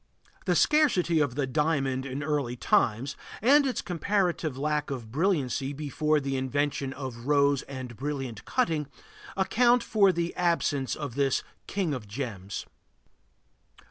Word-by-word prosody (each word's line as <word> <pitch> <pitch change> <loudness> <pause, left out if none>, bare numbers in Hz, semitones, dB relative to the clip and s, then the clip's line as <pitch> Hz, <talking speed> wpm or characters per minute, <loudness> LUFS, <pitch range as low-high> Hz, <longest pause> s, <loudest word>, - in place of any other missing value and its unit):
The 180 - +3
scarcity 190 - +3
of 140 -5 +1
the 145 -1 0
diamond 135 -2 0
in 135 +2 -4
early 140 -5 -1
times, 120 +2 +1 0.2
and 280 +5 +5
its 255 - -2
comparative 175 -5 0
lack 150 +1 -1
of 120 -5 -5
brilliancy 140 - 0
before 150 +1 0
the 135 -1 -2
invention 135 +1 -1
of 130 -3 -7
rose 140 -2 +3
and 130 -3 -6
brilliant 135 -3 -4
cutting, 160 - 0 0.5
account 240 +5 +3
for 200 -3 +4
the 170 -1 -2
absence 165 -6 +1
of 145 -5 -5
this 135 0 +1 0.2
king 185 -6 -1
of 120 -6 -5
gems. 100 -4 -5
145 Hz, 135 wpm, -28 LUFS, 130-170 Hz, 0.5 s, and